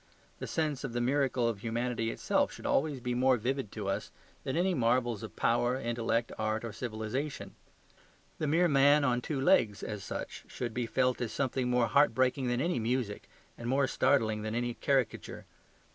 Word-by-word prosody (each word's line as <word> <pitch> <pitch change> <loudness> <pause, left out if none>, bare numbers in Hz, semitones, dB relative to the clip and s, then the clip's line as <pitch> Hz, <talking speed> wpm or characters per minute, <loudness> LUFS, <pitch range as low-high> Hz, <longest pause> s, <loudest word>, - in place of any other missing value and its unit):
The - - -5
sense 155 -4 -1
of 130 -4 -4
the 120 - -1
miracle 130 -1 +1
of 115 -4 -2
humanity 115 +1 -2
itself - - 0
should - - -11
be - - -2
always 140 -3 0
more 125 +1 +3
vivid 125 0 -2
to 105 -3 -5
us 95 - -2 0.3
than 135 - -2
any 185 +2 +2
marvels 120 - +1
of 110 - -8
power, 120 +2 +1
intellect, 115 -1 -1
art, 110 +1 -1
or 115 - -6
civilization. 110 0 -4 0.9
The 155 - -1
mere 170 +4 +3
man 145 0 +5
on 125 -3 +1
two 140 +2 -3
legs, 130 - +3
as 105 -3 -5
such, - - -6
should 120 -3 -5
be 120 -1 -2
felt 125 +1 +1
as 120 -2 -2
something 130 -2 -1
more 125 -1 +3
heartbreaking 130 +1 +2
than 120 +1 0
any 175 -2 0
music 115 -2 -2 0.3
and 120 0 -4
more 135 +1 +3
startling 125 -5 +2
than 110 +1 -3
any 120 0 -1
caricature. 135 0 -1
125 Hz, 180 wpm, -31 LUFS, 115-135 Hz, 0.9 s, man